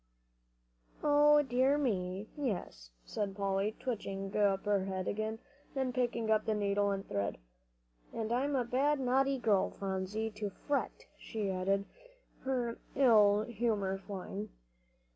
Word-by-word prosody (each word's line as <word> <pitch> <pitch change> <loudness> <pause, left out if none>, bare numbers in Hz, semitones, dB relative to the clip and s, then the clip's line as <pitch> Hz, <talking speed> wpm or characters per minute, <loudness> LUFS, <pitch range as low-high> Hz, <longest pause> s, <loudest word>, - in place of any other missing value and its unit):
"O 295 0 +6
dear 260 +2 +3
me, 195 -7 -1
yes," 195 - -4 0.2
said 200 -2 -3
Polly, 200 +1 0
twitching 195 -5 -4
up 200 -2 +2
her 200 -2 +2
head 190 -1 -3
again, 215 +1 -2 0.4
and 260 -2 0
picking 235 -3 0
up 215 - +3
the 220 - +1
needle 200 0 +1
and 195 -1 -3
thread. 100 -1 -2 0.7
"And 225 -1 -3
I'm 275 +4 +1
a 250 -2 +1
bad, 275 +4 +2
naughty 270 +1 +2
girl, 210 -6 +2
Phronsie, 195 +3 -3
to 210 -1 -2
fret," 280 +8 -3
she 210 -3 -3
added, 195 +2 0 0.5
her 245 -3 -2 0.2
ill 215 -6 +6
humor 210 -4 -1
flying. 195 +1 -6
215 Hz, 130 wpm, -33 LUFS, 195-250 Hz, 0.7 s, O